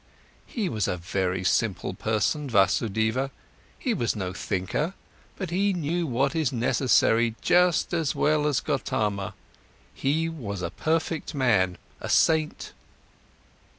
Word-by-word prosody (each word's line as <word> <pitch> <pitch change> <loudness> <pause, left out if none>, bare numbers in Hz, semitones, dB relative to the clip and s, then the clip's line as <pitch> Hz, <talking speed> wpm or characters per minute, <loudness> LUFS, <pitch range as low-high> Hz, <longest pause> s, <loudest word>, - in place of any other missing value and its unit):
He 220 -6 -2
was 110 - -1
a 90 - -1
very 90 +1 -2
simple 95 -1 0
person, 110 - -1
Vasudeva, 110 +4 +2 0.5
he 250 - -1
was 120 - 0
no 95 -3 -3
thinker, 100 - -2 0.4
but 190 -4 -4
he 195 +3 +2
knew 170 0 -1
what 135 +4 0
is 155 -5 +1
necessary 120 -2 +2
just 180 -1 +3
as 165 -4 0
well 150 0 +2
as 135 -7 +1
Gotama, 100 -2 -1 0.6
he 155 +4 0
was 105 - -5
a 85 - -2
perfect 160 -1 -1
man, 105 -10 +2 0.2
a - - -6
saint." 160 -1 +2
130 Hz, 125 wpm, -26 LUFS, 100-160 Hz, 0.6 s, just